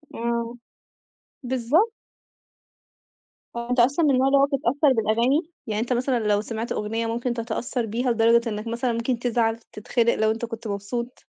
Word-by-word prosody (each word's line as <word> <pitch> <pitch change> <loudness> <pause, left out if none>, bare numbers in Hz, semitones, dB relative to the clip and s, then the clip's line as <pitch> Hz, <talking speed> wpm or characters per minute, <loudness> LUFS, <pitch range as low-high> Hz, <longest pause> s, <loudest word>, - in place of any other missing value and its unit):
آه. 235 0 -2 0.9
بالضب 260 - +2 1.7
هو 235 0 -5
أنت 250 0 +1
أصلًا 275 +7 +4
من 290 - +4
النوع 260 0 +3
اللي 275 +1 +4
هو 275 - +6
بيتأثّر 280 0 +2
بالأغاني؟ 235 +6 +2 0.3
يعني 215 0 -1
أنت 245 +2 0
مثلًا 250 0 +1
لو 205 0 +3
سمعت 225 +1 -5
أغنية 225 +2 -2
ممكن 235 +2 -1
تتأثّر 235 +1 -3
بيها 240 +4 -1
لدرجة 230 +1 +3
إنّك 210 +1 -5
مثلًا 235 +1 -1
ممكن 230 +1 -1
تزعل، 230 -2 +1
تتخنق 230 +1 -1
لو 220 0 +2
أنت 230 +1 -3
كنت 230 -1 -7
مبسوط؟ 225 +5 -5
235 Hz, 160 wpm, -24 LUFS, 225-250 Hz, 1.7 s, هو